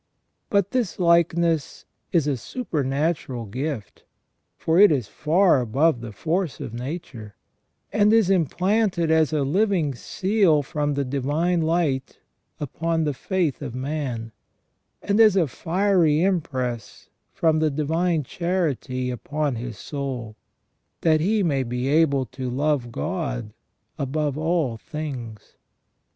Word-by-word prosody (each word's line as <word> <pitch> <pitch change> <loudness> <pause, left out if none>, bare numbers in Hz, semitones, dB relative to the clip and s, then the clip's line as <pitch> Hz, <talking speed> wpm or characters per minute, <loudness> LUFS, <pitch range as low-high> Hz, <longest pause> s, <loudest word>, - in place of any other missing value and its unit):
But 200 -1 +2
this 245 -7 -1
likeness 170 -2 +2 0.3
is 165 -5 +2
a 145 -2 +1
supernatural 145 - -2
gift, 130 +2 -5 0.5
for 165 +2 +2
it 205 -3 +8
is 130 -8 0
far 160 - +3
above 130 +3 +2
the 120 -2 -7
force 165 - -2
of 110 - -6
nature, 120 - -7 0.6
and 210 0 +4
is 225 -4 +4
implanted 185 0 +1
as 160 -1 +3
a 150 -2 +1
living 175 -1 +1
seal 185 - +1
from 145 +1 -2
the 140 0 -1
divine 145 +7 0
light 160 -5 0 0.4
upon 160 +3 -1
the 150 -2 0
faith 170 0 -1
of 125 -4 -5
man, 130 -4 -3 0.7
and 205 +2 +1
as 215 -3 +7
a 180 -4 +4
fiery 170 0 +2
impress 130 - -2 0.2
from 160 -1 +2
the 155 0 +2
divine 160 +3 0
charity 140 -6 -2
upon 145 +4 -2
his 120 -2 -6
soul, 130 -6 -5 0.7
that 155 -2 +3
he 205 +4 +2
may 140 -6 +1
be 125 +1 -2
able 140 -3 +3
to 130 0 -6
love 135 -1 0
God 135 - -3 0.5
above 145 +1 -1
all 155 -6 0
things. 130 - -7
150 Hz, 125 wpm, -24 LUFS, 130-170 Hz, 0.7 s, it